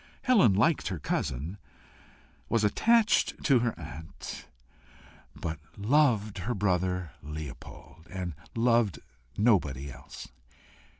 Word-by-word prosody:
Helen 205 - +5
liked 135 - +2
her 95 - -2
cousin, 75 +5 -3 0.9
was 115 -2 +2
attached 220 - +3
to 135 -5 +5
her 115 -1 -1
aunt, 80 0 -8 0.9
but 80 -1 -4 0.2
loved 110 -3 +2
her 110 +7 -2
brother 90 -3 0
Leopold, 75 +2 -9
and 90 -3 -4 0.2
loved 115 -5 +3 0.4
nobody 75 - +2
else. 65 +1 -10
100 Hz, 100 wpm, -29 LUFS, 80-115 Hz, 0.9 s, Helen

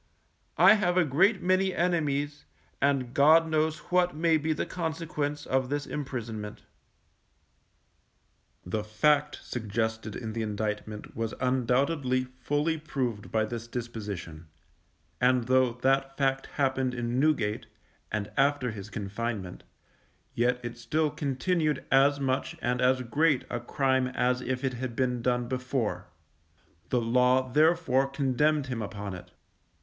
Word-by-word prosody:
I 185 +5 +8
have 185 -4 +1
a 180 - +5
great 190 - +3
many 185 +1 +2
enemies, 145 -4 0 0.4
and 135 -3 +1
God 160 +4 +6
knows 155 0 +1
what 180 -1 +3
may 165 +1 +3
be 155 +1 -1
the 155 - -1
consequence 160 -4 -3
of 130 -1 0
this 145 0 -2
imprisonment._ 115 -7 -5 2.0
The 105 +4 -2
fact 145 +8 +2
suggested 110 -1 -3
in 110 -2 -5
the 115 - -2
indictment 105 0 -4
was 115 0 -3
undoubtedly 130 +1 +1
fully 145 +5 -2
proved 125 -8 -3
by 110 -1 +2
this 115 +1 -6
disposition, 105 -9 -6 0.7
and 125 0 +4
though 130 0 +3
that 135 0 +1
fact 135 -1 0
happened 130 -2 0
in 120 +1 -1
Newgate, 130 -8 +1 0.4
and 105 -1 -3
after 135 -3 +2
his 105 -1 -8
confinement, 100 -1 -4 0.7
yet 125 +1 +1
it 120 0 -6
still 150 +6 0
continued 150 +2 -1
as 140 +2 +4
much 130 -1 -1
and 125 +1 -1
as 130 0 +3
great 145 +3 +2
a 120 - -1
crime 130 +1 +1
as 125 0 0
if 130 +1 -3
it 130 -1 0
had 125 -1 -5
been 125 -1 0
done 125 0 0
before; 125 -7 -2 0.8
the 125 - +2
Law 125 +2 +2
therefore 155 -4 +3
condemned 140 +2 +1
him 125 -3 -4
upon 100 -1 -5
it. 90 - -9
130 Hz, 135 wpm, -28 LUFS, 115-145 Hz, 2.0 s, I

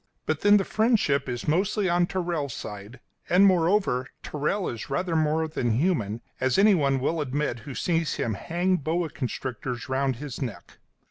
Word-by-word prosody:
But, 155 -1 -1
then, 205 0 +6
the 195 - +1
friendship 205 - +1
is 120 -1 -4
mostly 190 +5 +1
on 175 0 +2
Tyrrell's 170 -8 -2
side, 105 +4 -8 0.3
and, 185 +3 +6
moreover, 175 -8 +2 0.2
Tyrrell 155 +7 -1
is 115 -2 -5
rather 165 +5 -1
more 160 0 +1
than 120 -7 -1
human, 120 - 0 0.2
as 130 -1 +1
anyone 160 -10 +4
will 160 +5 0
admit 140 -2 -2
who 130 - -6
sees 165 -3 0
him 115 - -1
hang 175 - 0
boa 165 +2 -1
constrictors 125 -1 -4
round 130 0 0
his 135 +1 -7
neck. 120 -7 -6
150 Hz, 160 wpm, -26 LUFS, 130-180 Hz, 0.3 s, then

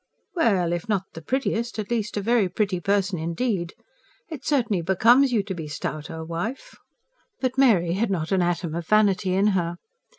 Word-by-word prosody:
Well, 195 - +2
if 175 +6 -4
not 200 -3 +1
the 165 - -8
prettiest, 235 - -2
at 215 +1 -4
least 215 -3 -1
a - - 0
very 220 -2 +2
pretty 190 -1 -1
person 195 -1 0
indeed. 170 +2 -2 0.5
It 305 -5 -7
certainly 235 - +1
becomes 235 +10 +4
you 220 -4 +2
to 195 -1 -5
be 160 -4 -6
stouter, 155 +2 -5
wife." 220 - -5 0.6
But 255 -1 -1
Mary 205 -11 +4
had 210 +4 0
not 170 -3 -2
an 190 -1 +3
atom 175 -2 -1
of 170 -1 -4
vanity 200 -3 +3
in 195 +2 +3
her. 175 -2 -1
195 Hz, 175 wpm, -24 LUFS, 175-230 Hz, 0.6 s, becomes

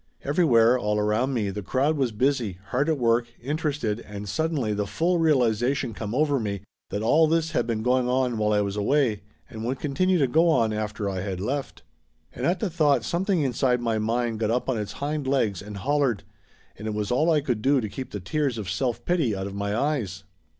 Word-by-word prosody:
Everywhere, 125 -6 +4
all 105 -2 0
around 105 +5 +1
me, 105 -4 0
the 105 +2 -5
crowd 135 +10 +1
was 135 -5 0
busy, 115 -4 0
hard 140 +5 +1
at 155 - +1
work, 120 -1 +2
interested, 140 -5 -2
and 105 -2 -8
suddenly 140 - -1
the 105 0 -2
full 170 - +1
realization 125 -4 +2
come 105 +2 -5
over 145 -1 +2
me 100 -4 -3 0.3
that 105 - -3
all 155 +8 +4
this 165 +1 +1
had 155 - 0
been 110 -2 -1
going 125 0 +2
on 125 -3 +1
while 105 0 +2
I 105 -1 +3
was 100 -1 -2
away 110 0 +1 0.3
and 110 0 -8
would 130 +3 -2
continue 185 +6 +1
to 145 - +3
go 160 +7 +3
on 115 -9 +2
after 105 -1 -3
I 95 -1 -2
had 95 -2 -4
left. 135 +8 -4 0.5
And 125 - -2
at 180 +1 +1
the 215 - 0
thought 150 -4 +3
something 180 0 0
inside 125 -1 +1
my 115 -2 0
mind 115 +1 -1
got 110 -2 0
up 125 +3 0
on 120 -4 0
its 105 - -4
hind 145 -1 -3
legs 115 -9 +1
and 105 0 -8
hollered, 135 - 0 0.6
and 105 - -5
it 105 - -2
was 105 0 -2
all 155 +7 +2
I 155 -3 +3
could 125 -6 -2
do 135 +3 +3
to 110 - -2
keep 130 +5 -7
the 105 - -5
tears 135 - -1
of 100 -4 -4
self 120 +4 -2
pity 160 - +1
out 95 0 -4
of 100 - -6
my 100 +1 -2
eyes. 115 - -1
120 Hz, 220 wpm, -25 LUFS, 105-145 Hz, 0.6 s, Everywhere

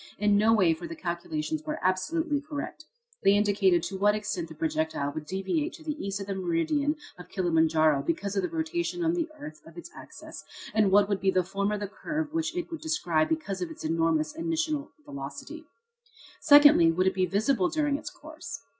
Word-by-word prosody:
In 205 0 +3
no 215 +2 +4
way, 190 -7 +4
for 170 +2 -7
the 165 - -7
calculations 300 - -3
were 310 0 -3
absolutely 290 - 0
correct. 295 +1 -6 0.4
They 195 - +5
indicated 200 -4 +3
to 190 -1 -4
what 205 +1 +4
extent 185 -6 -3
the 160 - -10
projectile 155 -2 -1
would 150 -1 -6
deviate 195 - -2
to 315 - -12
the 310 -1 -2
east 195 0 -3
of 195 - -5
the 200 - -3
meridian 190 - 0 0.2
of 180 - -11
Kilimanjaro 160 -5 +2
because 190 +7 -2
of 195 - +2
the - - -2
rotation 340 +2 -2
of 330 - +2
the 335 -2 -1
earth 155 - -9
on 165 - -14
its 170 - -9
axis, - - -11 0.3
and 215 -2 +3
what 200 +1 +5
would 200 -1 -1
be 195 - +2
the 185 -1 +2
form 200 +3 -2
of 210 0 -2
the 205 - -2
curve 305 +9 -4
which 330 +2 -2
it 350 0 -4
would 330 - -6
describe 175 - 0
because 200 - -2
of 175 - -2
its 160 - -9
enormous 165 - +1
initial 320 -2 -2 0.2
velocity. 140 - -8 0.7
Secondly, 290 - +7
would 180 +3 +1
it 190 - +2
be 185 -1 +1
visible 200 +1 +1
during 295 -2 0
its - - -7
course? 300 - -9
200 Hz, 200 wpm, -28 LUFS, -, 0.7 s, Secondly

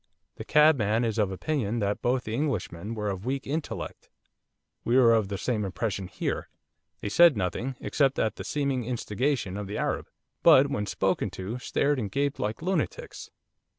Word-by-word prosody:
The - - -6
cabman 125 -7 +4
is 115 -1 -1
of 100 -3 +2
opinion 120 - -1
that 100 -2 -1
both 125 +1 +1
the 110 - -5
Englishmen 115 - -2
were 105 -2 -2
of 95 0 -6
weak 135 +3 -2
intellect. 150 +2 -5 0.7
We 120 +2 +2
were 120 -3 +6
of 110 -3 +2
the 100 0 -4
same 110 0 -1
impression 95 0 -3
here. - - -3 0.5
They - - -3
said 170 +2 +6
nothing, 115 +8 -2
except 135 -2 +1
at 110 -1 0
the - - -5
seeming 140 -4 -1
instigation 120 -2 -1
of 105 -1 -5
the 100 - -4
Arab, - - -1 0.3
but 140 +2 +6
when 105 -5 -2
spoken - - 0
to 100 +7 -4
stared 140 +2 0
and 105 -4 -2
gaped 140 +6 -1
like 105 +8 -3
lunatics. 185 -3 -3
115 Hz, 175 wpm, -27 LUFS, 105-140 Hz, 0.7 s, were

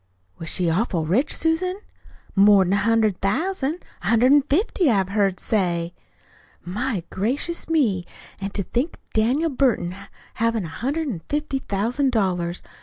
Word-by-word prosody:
"Was 165 - -5
she 180 -2 0
awful 170 -1 0
rich, 230 - +1
Susan?" 330 +3 +1 0.6
"More'n 195 -2 +5
a - - +3
hundred 215 -2 +2
thousand. 315 - -1 0.2
A 180 - -5
hundred 230 +4 +4
an' 290 0 +7
fifty, 320 - +1
I've 195 -5 +2
heard 195 -2 +1
say." 175 -5 0 0.7
"My 205 +1 -2
gracious 270 - -1
me! 220 - +1 0.3
An' 195 0 -3
to 200 0 -3
think 250 - -2
of - - -31
Daniel 260 +9 +2
Burton 240 -10 +1 0.4
havin' 230 -3 0
a - - -6
hundred 280 - -2
and 195 -12 -4
fifty 295 -2 -1
thousand 245 +6 0
dollars! 180 -6 0
220 Hz, 150 wpm, -23 LUFS, 190-280 Hz, 0.7 s, an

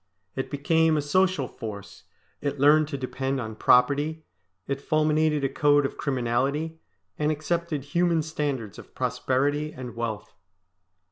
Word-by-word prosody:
It 130 - -3
became 160 +2 +2
a - - +2
social 185 -2 +2
force, 105 -4 -9 0.4
it 145 -1 -2
learned 150 +2 +5
to 140 -2 -4
depend 135 +1 -2
on 110 -3 -5
property, 145 +7 +3 0.4
it 140 0 -3
fulminated 155 -1 +2
a - - +3
code 145 +1 +3
of - - -3
criminality, 140 +5 -1 0.4
and 150 0 +2
accepted 155 -1 -2
human 170 +2 +1
standards 145 -9 -3
of - - -14
prosperity 145 +3 0
and 125 -4 -8
wealth. 115 -3 -4
145 Hz, 135 wpm, -26 LUFS, 130-155 Hz, 0.4 s, learned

